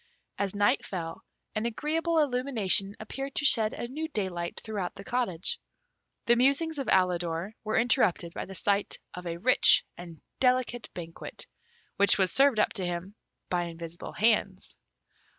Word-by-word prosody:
As 200 -1 -1
night 205 0 +2
fell, 165 -4 -5 0.3
an 215 +2 -1
agreeable 320 +7 -1
illumination 245 -9 +2
appeared 270 +5 -6
to 295 - 0
shed 220 -5 +4
a 240 - -5
new 305 +6 -4
daylight 185 - -3
throughout 205 -5 -4
the 200 - -9
cottage. 200 -7 -1 0.7
The 235 - +5
musings 280 +5 +2
of 270 - -3
Alidor 180 0 +1
were 215 0 -1
interrupted 220 -8 +2
by - - -5
the 190 - -9
sight 200 +1 0 0.2
of 180 0 -7
a 170 0 -3
rich 250 +9 +5
and 170 -2 -10 0.2
delicate 250 -2 +1
banquet, 165 -2 -8 0.5
which 200 0 +6
was 190 -2 +3
served 270 -5 +4
up - - +2
to 195 - -2
him 175 +2 -4 0.4
by 175 -1 +1
invisible 170 0 -8
hands. 210 -4 +1
205 Hz, 150 wpm, -28 LUFS, 180-250 Hz, 0.7 s, which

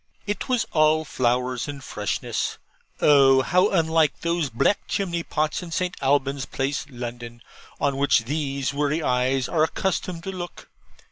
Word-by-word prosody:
It 205 +5 -3
was 250 -3 +2
all 155 0 +3
flowers 125 -1 0
and 140 -2 -7
freshness. 105 -5 -3 0.4
Oh, 135 -2 +6
how 180 +8 +3
unlike 160 -4 +2
those 170 -3 0
black 130 - +1
chimney 175 -4 -1
pots 155 0 -1
in 175 - -8
St. 180 +2 -2
Alban's 140 -1 +1
Place, 140 +2 -2
London, 120 -2 -7 0.4
on 140 -1 0
which 140 -4 +3
these 140 0 -2
weary 150 +2 0
eyes 125 0 +1
are 155 -2 +2
accustomed 170 +1 -2
to 195 - -4
look. 175 -2 -8
145 Hz, 145 wpm, -24 LUFS, 130-165 Hz, 0.4 s, Oh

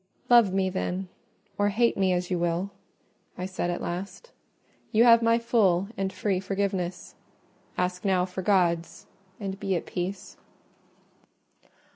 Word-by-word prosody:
"Love 235 -5 +7
me, 190 0 +1
then, 185 0 -3 0.5
or 205 0 +3
hate 230 +3 +2
me, 190 -1 +2
as 180 0 -1
you 180 - +1
will," 175 +3 -1 0.7
I 180 - -3
said 185 -2 -3
at 175 - -3
last, 195 - -6 0.6
"you 220 +2 +5
have 230 -1 +7
my 230 0 +4
full 210 -6 +2
and 195 0 -2
free 190 -1 -1
forgiveness: 190 -2 -3 0.6
ask 180 0 -1
now 185 -3 +2
for 185 0 -6
God's, 180 -2 +1 0.3
and 195 -2 -5
be 195 -2 -1
at 170 - -3
peace." 185 +2 -5
190 Hz, 140 wpm, -27 LUFS, 180-200 Hz, 0.7 s, Love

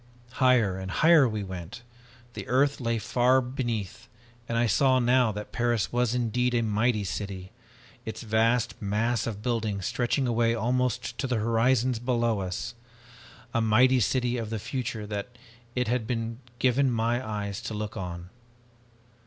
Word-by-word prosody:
"Higher 125 -8 +3
and 95 0 -6
higher 155 - +5
we 110 -2 -3
went. 95 +5 -8 0.5
The - - -7
earth 140 +3 +2
lay 115 -1 0
far 125 +4 +3
beneath 120 -4 -4 0.4
and 115 - 0
I 120 - +3
saw 130 +3 +3
now 125 -1 +3
that 105 0 -7
Paris 120 -2 0
was 120 -1 +1
indeed 125 +1 0
a 115 - +2
mighty 110 0 +1
city, 95 -1 -5 0.5
its 110 - -6
vast 115 +1 +1
mass 110 +3 0
of 105 -2 -5
buildings 110 -6 -1
stretching 125 +2 0
away 115 -1 +2
almost 125 +1 -1
to 135 - -1
the 125 - 0
horizons 115 +2 +2
below 120 -3 0
us. 95 +5 -4 0.8
A 115 - +2
mighty 125 +4 +4
city 125 +2 +1
of 115 -2 -4
the 110 - -2
future 120 0 -4
that 105 +4 -6 0.4
it 125 0 0
had 120 -1 -1
been 115 -1 -3 0.2
given 130 +2 +2
my 120 +1 0
eyes 105 -3 -4
to 110 - -5
look 105 0 -4
on! 90 -1 -6
115 Hz, 155 wpm, -27 LUFS, 105-125 Hz, 0.8 s, higher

